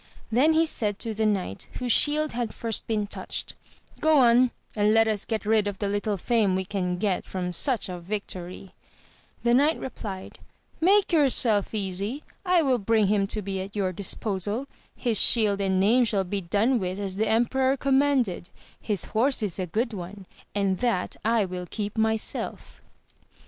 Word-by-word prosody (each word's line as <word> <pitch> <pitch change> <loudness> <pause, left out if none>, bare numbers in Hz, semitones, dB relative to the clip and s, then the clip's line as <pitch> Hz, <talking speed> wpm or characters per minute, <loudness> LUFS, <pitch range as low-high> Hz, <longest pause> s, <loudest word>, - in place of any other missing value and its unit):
then 275 +8 +4
he 325 +1 +4
said 210 -10 -2
to 225 0 -4
the 220 +1 0
knight, 190 - -2
whose 250 -1 -1
shield 305 +3 +4
had 235 -2 -4
first 230 -2 -3
been 215 -2 0
touched, 205 - -5 0.5
Go 315 -1 +4
on, 245 -1 +5 0.3
and 210 0 +3
let 225 0 +5
us 215 -2 -1
get 220 -2 -3
rid 215 -1 +2
of 200 -1 -4
the 205 - -2
little 205 +1 -1
fame 210 -1 +1
we 190 0 -2
can 180 -2 -2
get 195 -1 -1
from 180 -1 -4
such 245 - +1
a - - -6
yio - - -4
AMADIS 175 - -12
OF 175 - -18
GAUL. 200 -3 -3
5 - - -8
toiy! 185 +2 -10 0.7
the 235 0 +3
knight 290 +6 +3
replied, 200 -7 -7 0.4
Make 380 +2 +3
yourself 240 - +2
easy! 200 +7 -2 0.2
I 360 -3 +3
will 260 -4 +2
bring 220 +1 +2
him 200 -1 +2
to 215 +1 -3
be 195 0 -3
at 195 +2 -8
your 195 -3 0
disposal; 205 +5 -2 0.3
his 230 -5 +2
shield 210 -4 +4
and 190 -1 +1
name 225 +6 +4
shall 210 -4 +1
be 195 +2 -3
done 210 +8 +1
with 185 0 -3
as 195 -2 -4
the 220 - +1
emperor 260 +4 +2
commanded: 265 -10 +1 0.3
his 205 -5 -2
horse 245 +2 +1
is 195 -3 -3
a 185 - -2
good 225 +7 -1
one, 190 +1 -8 0.3
and 195 -2 0
that 235 -7 -1
I 225 -2 +2
will 180 -1 -6
keep 210 -1 -4
myself. 220 -1 -1
215 Hz, 190 wpm, -26 LUFS, 195-240 Hz, 0.7 s, on